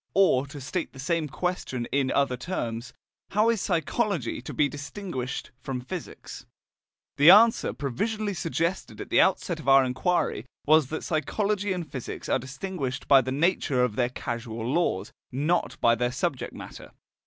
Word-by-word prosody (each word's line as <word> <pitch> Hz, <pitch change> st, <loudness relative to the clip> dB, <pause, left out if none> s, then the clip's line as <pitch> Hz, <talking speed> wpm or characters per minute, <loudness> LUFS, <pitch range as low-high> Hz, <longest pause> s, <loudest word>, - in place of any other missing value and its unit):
Or, 145 Hz, -9 st, +4 dB
to 145 Hz, +1 st, -9 dB
state 155 Hz, +6 st, -4 dB
the 135 Hz, -, -12 dB
same 160 Hz, +3 st, 0 dB
question 145 Hz, -7 st, -3 dB
in 135 Hz, 0 st, +1 dB
other 140 Hz, -2 st, +2 dB
terms: 120 Hz, -5 st, -4 dB, 0.4 s
How 215 Hz, +3 st, +3 dB
is 225 Hz, -5 st, -1 dB
psychology 175 Hz, -, -1 dB
to -, -, -7 dB
be 150 Hz, -, +2 dB
distinguished 145 Hz, -3 st, -5 dB
from 130 Hz, -1 st, -4 dB
physics? 165 Hz, +7 st, -8 dB, 0.7 s
The 145 Hz, +4 st, +8 dB
answer 225 Hz, +5 st, +7 dB
provisionally 205 Hz, -, -2 dB
suggested 170 Hz, +1 st, -2 dB
at -, -, -7 dB
the -, -, +6 dB
outset -, -, +1 dB
of 135 Hz, -, -2 dB
our 135 Hz, -1 st, +7 dB
inquiry 130 Hz, -1 st, 0 dB, 0.2 s
was 155 Hz, -2 st, +5 dB
that 160 Hz, +3 st, -4 dB
psychology 200 Hz, +6 st, -1 dB
and 180 Hz, -3 st, -3 dB
physics 130 Hz, -5 st, -6 dB
are -, -, +2 dB
distinguished 135 Hz, +1 st, -5 dB
by 135 Hz, -1 st, +7 dB
the 130 Hz, +1 st, -4 dB
nature 145 Hz, -3 st, +2 dB
of 120 Hz, -4 st, 0 dB
their 120 Hz, 0 st, +1 dB
causal 115 Hz, -2 st, -5 dB
laws, 170 Hz, +7 st, 0 dB, 0.2 s
not 150 Hz, +7 st, 0 dB
by 115 Hz, -, +5 dB
their 120 Hz, +1 st, 0 dB
subject 125 Hz, -, -2 dB
matter. -, -, -10 dB
145 Hz, 160 wpm, -27 LUFS, 130-180 Hz, 0.7 s, The